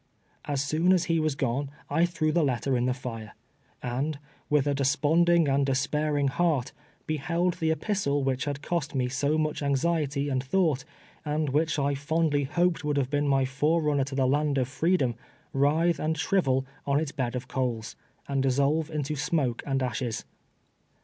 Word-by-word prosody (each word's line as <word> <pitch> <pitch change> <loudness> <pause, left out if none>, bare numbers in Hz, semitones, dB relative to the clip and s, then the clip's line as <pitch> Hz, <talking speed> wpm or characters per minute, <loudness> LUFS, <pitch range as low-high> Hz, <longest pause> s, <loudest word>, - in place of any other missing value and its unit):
As 140 -1 -1
soon 160 +6 +2
as 180 -2 +3
he 165 -1 +1
was 155 -3 0
gone 135 +1 -1 0.2
I 170 - +2
tlirew 165 -3 -1
the 170 -1 +3
letter 135 -1 0
in 125 0 +1
the 130 +1 -1
lire, 115 -3 -6 0.5
and, 135 +5 -2 0.3
with 150 -2 +3
a 145 - +1
desponding 155 +4 +3
and 140 0 +2
despairing 145 +2 +1
heart, 150 -4 0 0.3
beheld 170 +4 -1
the 160 -2 +1
epistle 160 -5 0
which 130 -2 0
had 145 -1 -4
cost 165 -5 -2
me 125 -1 +1
so 140 +4 0
ninch 155 -1 -1
anxiety 140 0 0
and 130 -2 -1
thought, 145 -2 +1 0.4
and 150 0 -1
which 155 +3 +1
I 140 0 +1
fondly 145 0 0
hoped 175 +4 +1
would 150 -1 0
have 135 -2 0
been 145 0 +1
my 135 -1 +3
forerunner 145 +1 +1
to 135 0 -6
the 135 -1 +2
land 145 +2 +1
of 130 -2 +1
freedom, 140 -1 +1 0.4
writhe 155 +5 +2
and 160 +1 -1
shrivel 135 -7 +1 0.2
on 140 +1 +3
its 155 -2 -2
bed 130 -4 -2
of 125 +1 -4
coals, 120 -5 -2 0.3
and 140 -1 0
dissolve 140 +4 +1
into 150 -1 -2
smoke 145 -4 0
and 135 -1 0
ashes. 120 -2 -3
145 Hz, 175 wpm, -27 LUFS, 135-155 Hz, 0.5 s, as